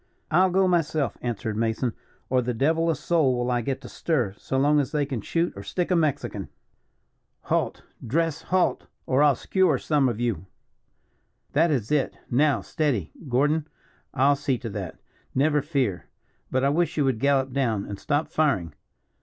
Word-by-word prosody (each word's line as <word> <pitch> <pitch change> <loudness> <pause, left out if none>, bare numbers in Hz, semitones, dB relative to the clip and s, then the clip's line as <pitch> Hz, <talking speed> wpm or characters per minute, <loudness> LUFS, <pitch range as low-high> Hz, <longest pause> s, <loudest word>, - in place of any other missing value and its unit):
"I'll 185 +4 +5
go 190 +1 +3
myself," 155 - +1
answered 110 -3 -3
Mason, 115 +2 0 0.3
"or 130 0 +2
the 125 0 -2
devil 160 +7 +2
a 165 - +2
soul 150 -8 +1
will 120 +1 -1
I 120 -1 +1
get 135 +3 -3
to - - -9
stir, 125 - -1
so 135 - -3
long 145 +2 +4
as 140 - -1
they 150 -2 +1
can 135 -5 -4
shoot 170 - -1
or 100 - -7
stick 175 - -2
a - - +4
Mexican. 140 - -1 0.9
Halt! - - -1 0.2
dress 165 +5 0
halt! 185 -1 +1 0.2
or 130 +2 +2
I'll 145 -2 +5
scewer 185 0 +2
some 145 -4 +2
of 115 -2 -4
you. 110 -7 -2 1.1
That 165 +4 +4
is 125 -7 -1
it. 150 -3 +1
Now 145 +4 +3
steady. 135 - -1 0.2
Gordon, 150 +5 +2 0.4
I'll 140 +3 +3
see 140 -2 -1
to 115 -2 -6
that 95 -4 -6 0.4
never 150 +2 +3
fear. 135 - -1 0.4
But 130 0 0
I 140 - +4
wish 165 +4 0
you 145 - +3
would 130 -4 0
gallop 135 -1 +2
down, 115 -7 0
and 100 -1 -7
stop 145 +1 0
firing. 100 - 0
140 Hz, 175 wpm, -25 LUFS, 120-155 Hz, 1.1 s, I'll